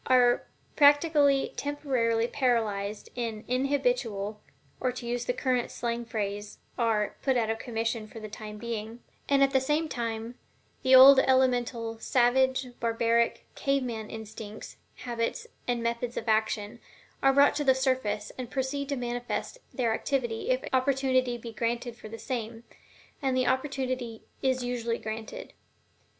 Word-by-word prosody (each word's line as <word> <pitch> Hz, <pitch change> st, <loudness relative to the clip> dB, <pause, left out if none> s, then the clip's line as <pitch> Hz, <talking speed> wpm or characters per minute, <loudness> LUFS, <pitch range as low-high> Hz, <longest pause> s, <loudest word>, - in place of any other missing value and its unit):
are 245 Hz, -1 st, +4 dB, 0.3 s
practically 290 Hz, -1 st, +4 dB
temporarily 255 Hz, -6 st, 0 dB
paralyzed 220 Hz, -6 st, -1 dB
in 225 Hz, -3 st, -4 dB
inhibitual 250 Hz, -, 0 dB, 0.4 s
or 255 Hz, -, 0 dB
to 250 Hz, -1 st, -8 dB
use 240 Hz, 0 st, -2 dB
the -, -, +1 dB
current 250 Hz, -1 st, 0 dB
slang 235 Hz, 0 st, -3 dB
phrase, 205 Hz, -2 st, -4 dB, 0.2 s
are 220 Hz, -3 st, 0 dB
"put 265 Hz, -2 st, +2 dB
out 225 Hz, -2 st, +1 dB
of 225 Hz, -, -3 dB
commission" 225 Hz, -1 st, -2 dB
for 225 Hz, -, -10 dB
the 215 Hz, -, -7 dB
time 210 Hz, 0 st, -8 dB
being; 225 Hz, 0 st, -5 dB, 0.3 s
and, 275 Hz, -1 st, +5 dB
at 275 Hz, -, +3 dB
the 265 Hz, -, +3 dB
same 300 Hz, +4 st, +1 dB
time, 230 Hz, -3 st, -4 dB, 0.5 s
the 260 Hz, 0 st, +6 dB
old 265 Hz, +1 st, +10 dB
elemental, 245 Hz, -4 st, +1 dB
savage, 260 Hz, +2 st, +2 dB
barbaric, 230 Hz, 0 st, +1 dB
"cave 275 Hz, -1 st, 0 dB
man" 225 Hz, -3 st, -5 dB
instincts, 220 Hz, -1 st, -8 dB, 0.2 s
habits, 235 Hz, -2 st, -3 dB, 0.2 s
and 240 Hz, -1 st, 0 dB
methods 235 Hz, +1 st, -2 dB
of 225 Hz, -, -4 dB
action, 215 Hz, -1 st, 0 dB, 0.4 s
are 270 Hz, -, +5 dB
brought 280 Hz, +1 st, +6 dB
to 295 Hz, -, -1 dB
the 265 Hz, -2 st, +4 dB
surface, 255 Hz, -6 st, -1 dB
and 250 Hz, -2 st, -5 dB
proceed 275 Hz, +2 st, -2 dB
to 280 Hz, -, 0 dB
manifest 245 Hz, -, -4 dB
their 235 Hz, -4 st, 0 dB
activity 240 Hz, -2 st, -2 dB
if 255 Hz, 0 st, +1 dB
opportunity 260 Hz, -2 st, +2 dB
be 230 Hz, -1 st, -9 dB
granted 235 Hz, +1 st, -2 dB
for 215 Hz, -, -11 dB
the 225 Hz, -, -7 dB
same 230 Hz, -2 st, -5 dB, 0.6 s
and 265 Hz, -2 st, +1 dB
the 255 Hz, -, +2 dB
opportunity 255 Hz, -3 st, -2 dB, 0.2 s
is 260 Hz, -1 st, +1 dB
usually 235 Hz, -1 st, -2 dB
granted. 220 Hz, 0 st, -7 dB
240 Hz, 145 wpm, -28 LUFS, 225-260 Hz, 0.6 s, old